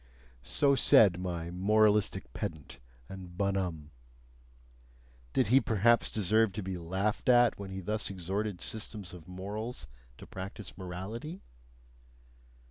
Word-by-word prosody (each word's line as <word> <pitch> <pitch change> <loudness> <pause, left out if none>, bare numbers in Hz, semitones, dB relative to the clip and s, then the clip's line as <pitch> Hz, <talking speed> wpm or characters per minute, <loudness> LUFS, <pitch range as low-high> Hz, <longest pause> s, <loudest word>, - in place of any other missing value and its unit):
So 140 - +2
said 110 -10 +6
my 85 -2 -4
moralistic 105 - +2
pedant 80 -3 -6 0.3
and 90 -2 -10
bonhomme. 95 -6 -1 1.4
Did 120 - +1
he 135 +3 +6
perhaps 115 +2 +3
deserve 110 0 +2
to 105 0 -4
be 95 -1 -4
laughed 95 +8 -1
at 120 -3 +5
when 100 -1 -6
he 95 0 -5
thus 105 +3 -2
exhorted 95 +1 -3
systems 105 -4 -5
of 85 -3 -11
morals 105 +6 -5 0.3
to - - -11
practise 95 +2 -8
morality? 100 - -6
100 Hz, 120 wpm, -31 LUFS, 90-110 Hz, 1.4 s, said